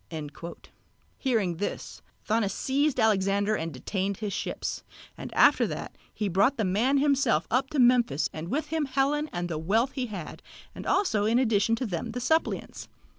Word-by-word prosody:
Hearing 215 - 0
this, 205 - -5 0.3
Thonis 215 -2 +2
seized 280 +2 0
Alexander 200 -1 +2
and 165 -4 -3
detained 190 - -3
his 210 -2 -4
ships, - - -4 0.3
and - - -8
after - - +5
that - - -6 0.2
he 210 - -2
brought 200 +9 +2
the 220 - 0
man 225 +9 +2
himself 275 - +2
up 260 +3 +1
to 305 - -4
Memphis 240 - +4
and 160 +1 -6
with 300 - -2
him 315 -1 0
Helen 280 +3 0
and 175 0 -3
the 160 -3 -3
wealth 220 +11 +1
he 260 -2 -3
had, 195 -7 -7 0.3
and - - -8
also 215 - +2
in 225 +2 +3
addition 225 -3 +2
to 255 - -3
them 210 +3 -4
the 250 - -3
suppliants. 320 +6 -1
225 Hz, 170 wpm, -27 LUFS, 195-265 Hz, 0.3 s, after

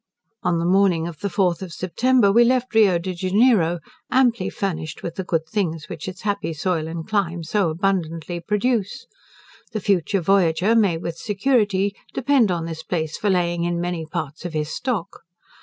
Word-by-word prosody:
On 175 -1 +1
the 165 - -1
morning 180 -3 +3
of 165 -3 -8
the 200 - -2
fourth 180 -2 +1
of 185 -2 -6
September 210 +5 +2
we 235 +4 +6
left 250 +1 +1
Rio 205 -5 +5
de 185 +2 -4
Janeiro, 185 -1 +3 0.3
amply 240 -6 +2
furnished 165 -5 -4
with 170 - -4
the 190 - -4
good 165 -3 -1
things 165 -7 -2
which 155 - -7
its 185 0 -7
happy 200 -5 -1
soil 160 0 -1
and 165 0 -6
clime 180 -6 -1
so 185 +2 +1
abundantly 170 -1 -1
produce. 210 +5 -1 0.7
The 215 - -1
future 195 -2 +1
voyager 185 +2 +3
may 200 -7 +3
with 165 0 -5
security 205 -1 +1 0.2
depend 265 -5 +3
on 170 -2 -1
this 165 -1 -5
place 160 -2 -3
for 210 - -1
laying 175 -2 +1
in 175 0 -1
many 175 -1 -2
parts 155 -2 -5
of 175 -2 -5
his 150 -1 -2
stock. 240 -9 -3
185 Hz, 175 wpm, -22 LUFS, 165-205 Hz, 0.7 s, we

